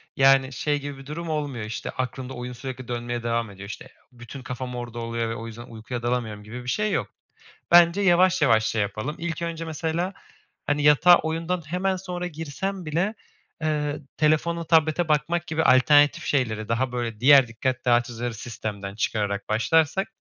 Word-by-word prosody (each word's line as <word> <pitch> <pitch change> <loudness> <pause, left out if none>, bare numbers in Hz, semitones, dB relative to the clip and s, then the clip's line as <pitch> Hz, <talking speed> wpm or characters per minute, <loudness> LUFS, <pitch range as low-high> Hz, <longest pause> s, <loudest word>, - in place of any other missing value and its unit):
Yani, 135 0 +4
şey, 145 +1 -1
gibi 145 0 -7
bir 135 - -12
durum 165 +3 -6
olmuyor, 145 -8 -3
işte, 110 - -5
aklında 130 +1 -4
oyun 125 0 -6
sürekli 130 0 -7
dönmeye 120 0 -3
devam 115 -1 -1
ediyor, 100 0 -10
işte, - - -8
eee, - - -17 0.3
bütün 120 +2 -9
kafam 125 0 -5
orada 120 -1 -6
oluyor 115 0 -2
ve 115 - -3
o 115 +1 -7
yüzden 115 +1 -9
uykuya 115 +2 -7
dalamıyorum 115 -4 -2
gibi 120 +4 -8
bir 125 - -5
şey 210 +8 0
yok. - - 0 0.6
Bence 175 +3 +6
yavaş, 185 -1 +4
yavaş 115 -6 +4
şey 110 -1 0
yapalım. 110 +8 -3
İlk 170 0 -4
önce 165 -1 -4
mesela, 165 +4 -2 0.5
hani, 145 0 +1
yatağa 150 +4 +7
oyundan 165 +2 -2
hemen 185 +3 0
sonra 180 -1 -5
girsen 170 +4 -5
bile, 175 +8 -1 0.5
eee, 150 -2 -1 0.2
telefona, 160 +2 +1
tablete 160 +1 +2
bakmak 155 +3 0
gibi 160 0 0
alternatif 145 +3 +5
şeyleri 115 -6 -1
daha 125 +2 0
böyle 120 -3 -3
diğer 135 +1 +7
dikkat 125 +3 -3
dağıtıcıları 120 0 +1
sistemden 105 -3 -6
çıkararak 105 -2 -2
başlarsak 160 - +2
135 Hz, 170 wpm, -25 LUFS, 115-160 Hz, 0.6 s, yatağa